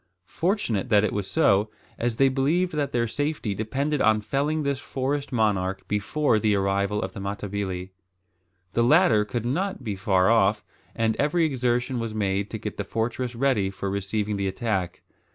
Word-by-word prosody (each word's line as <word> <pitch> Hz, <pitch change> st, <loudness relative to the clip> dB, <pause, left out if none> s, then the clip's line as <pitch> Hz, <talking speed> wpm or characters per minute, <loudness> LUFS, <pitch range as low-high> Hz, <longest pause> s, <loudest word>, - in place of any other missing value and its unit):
Fortunate 165 Hz, -, -1 dB
that 105 Hz, -2 st, +5 dB
it -, -, 0 dB
was 100 Hz, -1 st, -3 dB
so, 100 Hz, +1 st, +3 dB, 0.3 s
as 120 Hz, -1 st, 0 dB
they 135 Hz, +3 st, +4 dB
believed 150 Hz, +7 st, +1 dB
that 145 Hz, -2 st, -1 dB
their 120 Hz, -1 st, +1 dB
safety 145 Hz, -3 st, -2 dB
depended 135 Hz, +8 st, -1 dB
on 110 Hz, -1 st, +4 dB
felling 145 Hz, +7 st, -1 dB
this 140 Hz, -1 st, -1 dB
forest 140 Hz, +1 st, -3 dB
monarch 100 Hz, -5 st, 0 dB
before 110 Hz, +4 st, +1 dB
the 105 Hz, -1 st, +2 dB
arrival 100 Hz, +1 st, 0 dB
of -, -, -5 dB
the 110 Hz, -, -7 dB
Matabili. 100 Hz, -2 st, -4 dB, 0.8 s
The 115 Hz, -, +2 dB
latter 125 Hz, -, +5 dB
could 115 Hz, +2 st, -4 dB
not 185 Hz, +6 st, -2 dB
be 105 Hz, -4 st, -3 dB
far 95 Hz, -1 st, +2 dB
off, 105 Hz, -2 st, +3 dB, 0.3 s
and 110 Hz, -1 st, +1 dB
every 160 Hz, +3 st, +2 dB
exertion 125 Hz, -2 st, 0 dB
was 115 Hz, -2 st, -4 dB
made 100 Hz, -1 st, 0 dB
to 110 Hz, -, -4 dB
get 105 Hz, -1 st, -6 dB
the 105 Hz, -, -2 dB
fortress 115 Hz, +4 st, -2 dB
ready 120 Hz, -6 st, +1 dB
for 100 Hz, 0 st, -4 dB
receiving 100 Hz, +1 st, -2 dB
the 100 Hz, 0 st, -1 dB
attack. 95 Hz, -4 st, -2 dB
110 Hz, 170 wpm, -25 LUFS, 100-135 Hz, 0.8 s, that